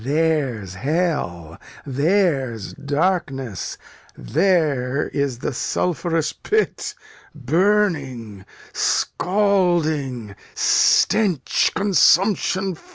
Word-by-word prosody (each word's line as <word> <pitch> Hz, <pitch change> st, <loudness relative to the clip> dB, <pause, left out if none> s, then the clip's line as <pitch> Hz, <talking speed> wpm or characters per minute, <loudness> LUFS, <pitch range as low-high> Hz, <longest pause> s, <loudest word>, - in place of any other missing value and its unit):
There's 140 Hz, -, -1 dB
hell, 95 Hz, -, -2 dB, 0.3 s
there's 140 Hz, -, 0 dB
darkness, 145 Hz, -, -2 dB, 0.4 s
there's 140 Hz, -, 0 dB
the 130 Hz, -, -4 dB
sulphurous 165 Hz, +3 st, -1 dB
pit; 430 Hz, 0 st, -2 dB, 0.4 s
burning, 145 Hz, -, 0 dB, 0.3 s
scalding, 165 Hz, -, 0 dB, 0.2 s
stench, 190 Hz, -, +2 dB
consumption. 195 Hz, -1 st, +2 dB
150 Hz, 55 wpm, -21 LUFS, 125-180 Hz, 0.4 s, stench